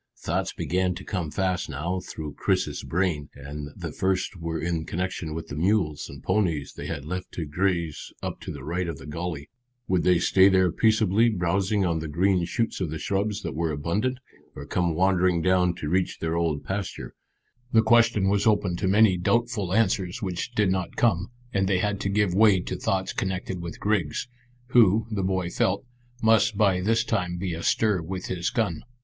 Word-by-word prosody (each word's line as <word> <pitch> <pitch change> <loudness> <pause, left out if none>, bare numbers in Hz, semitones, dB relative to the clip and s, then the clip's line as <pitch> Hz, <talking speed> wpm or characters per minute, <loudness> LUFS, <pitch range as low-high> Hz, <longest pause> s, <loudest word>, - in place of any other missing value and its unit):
Thoughts - - -2
began 90 0 -1
to 95 - -8
come 90 -6 -3
fast 90 +4 -1
now 85 +7 -2
through 75 -4 -7
Chris's - - 0
brain, 85 -5 -1
and 70 +1 -7
the - - -6
first 95 +1 -1
were 85 -2 -4
in 85 -1 -1
connection 85 -2 -3
with 80 - -6
the 70 - -5
mules 85 -3 0
and 70 -1 -11
ponies 85 -9 0
they - - -7
had 70 - -5
left 90 +3 -5
to 85 - -3
graze 85 0 -1
up - - -4
to - - -7
the - - -8
right 85 +2 -2
of 85 -4 -4
the - - -11
gully. 75 -1 -5 0.4
Would 90 -2 +2
they 90 +1 +4
stay 95 +3 +5
there 95 -2 +3
peacefully 110 +1 +3
browsing 95 +1 +1
on 85 -2 0
the 80 - -4
green 90 +3 +2
shoots 115 +4 -2
of 90 - -1
the 80 - -4
shrubs 100 +5 -1
that - - -3
were 80 0 -1
abundant, 100 - -1 0.4
or - - -7
come 85 -3 0
wandering 90 -1 +3
down 90 0 +2
to 75 - -5
reach 90 +2 0
their 80 0 -2
old 80 -4 0
pasture? 95 0 -4 0.6
The 110 -1 +5
question 115 -3 +4
was 100 +2 +2
open 100 -5 +2
to 95 - -1
many 100 -1 +5
doubtful 110 0 0
answers 95 -3 +1
which 95 +4 -4
did 105 -4 +3
not 95 -2 -2
come, 100 -5 +2 0.2
and 95 -1 +1
they 95 -1 +2
had 105 +1 -1
to 100 - -1
give 100 -2 +1
way 100 -1 +5
to - - -4
thoughts 95 0 -1
connected 95 -1 -3
with 85 -1 -7
Griggs, 100 -3 0 0.4
who, 110 -3 +5
the 105 -2 -1
boy 95 -2 -1
felt, 100 +5 0 0.4
must 110 -1 +4
by 95 -4 +3
this 115 +4 +2
time 90 -6 -1
be 90 -1 -3
astir 90 +3 +1
with 90 +3 -5
his 90 -1 -1
gun. 110 - -1
95 Hz, 190 wpm, -26 LUFS, 85-100 Hz, 0.6 s, stay